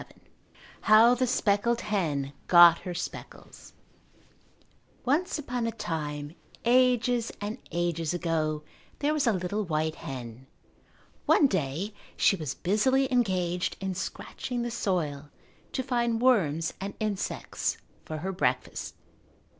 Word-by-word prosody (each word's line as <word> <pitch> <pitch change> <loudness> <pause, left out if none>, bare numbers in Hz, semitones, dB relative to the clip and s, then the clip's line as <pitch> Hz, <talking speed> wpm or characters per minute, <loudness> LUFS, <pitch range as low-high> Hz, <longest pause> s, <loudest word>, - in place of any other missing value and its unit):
VII - - -14 0.7
How 225 +3 +8
the 250 +1 +1
Speckled 230 0 +1
Hen 155 -10 -1
Got 175 -1 +8
Her 180 - -6
Speckles 175 - -8 1.3
Once 310 +9 +1
upon 245 -5 -2
a - - -1
time, 150 -7 -4 0.3
ages 245 -1 +3
and 205 +2 -4
ages 170 -2 -1
ago, 160 -3 -1 0.3
there 295 +1 +1
was 295 -4 +1
a - - +5
little 195 +2 -2
white 155 -3 -1
hen. 125 -3 -8 0.8
One 300 - +6
day 185 - -1 0.2
she - - +4
was 155 -6 -4
busily 260 +8 +2
engaged 180 -7 0
in 190 -1 -2
scratching 240 +6 -4
the 240 - -3
soil 155 -10 -2 0.4
to 260 - -1
find 235 -3 0
worms 170 - +2
and 200 +1 -5
insects 210 -3 -2 0.3
for 155 - -5
her 190 - -1
breakfast. 125 -9 -2
195 Hz, 120 wpm, -28 LUFS, 160-235 Hz, 1.3 s, How